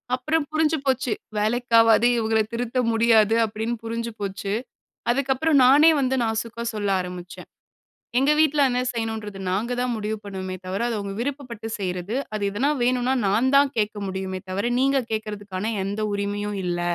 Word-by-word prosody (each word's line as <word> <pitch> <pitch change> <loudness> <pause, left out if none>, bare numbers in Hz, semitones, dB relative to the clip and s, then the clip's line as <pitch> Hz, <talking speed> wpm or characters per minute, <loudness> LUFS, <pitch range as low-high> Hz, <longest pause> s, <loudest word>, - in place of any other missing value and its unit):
அப்புறம் 305 +4 0
புரிஞ்சு 310 0 +1
போச்சு. 260 -3 +1 0.3
"வேலைக்காவாது, 230 +1 +4
இவுங்கள 220 -1 +2
திருத்த 245 +1 -2
முடியாது" 225 -1 +4
அப்படின்னு 220 +2 -3
புரிஞ்சு 230 0 -3
போச்சு. 200 0 -3 0.6
அதுக்கப்புறம் 275 +3 +2
நானே 295 +5 +7
வந்து 265 0 +1
நாசுக்கா 230 +1 -2
சொல்ல 205 -2 -2
ஆரம்பிச்சேன். 180 0 -8 0.7
"எங்க 275 +3 +3
வீட்ல 300 -2 +3
என்ன 250 +1 0
செய்யணுன்றது 220 -3 -4
நாங்க 215 +6 -1
தான் 250 -1 0
முடிவு 215 0 -3
பண்ணுவோமே 190 -2 -5
தவிர, 190 +4 -2
அது 230 - -2
அவங்க 200 -1 -5
விருப்பப்பட்டு 250 -5 -5
செய்றது. 185 +4 -3 0.2
அது 210 - -3
எதனா 265 +8 +1
வேணுன்னா, 250 +1 +1
நான் 240 +7 +2
தான் 280 -1 +4
கேட்க 210 -1 0
முடியுமே 190 0 -4
தவர, 200 +6 -1
நீங்க 275 0 +3
கேக்கறதுக்கான 210 -1 -4
எந்த 205 +2 -3
உரிமையும் 205 0 -2
இல்ல." 175 0 -1
225 Hz, 150 wpm, -24 LUFS, 205-255 Hz, 0.7 s, நானே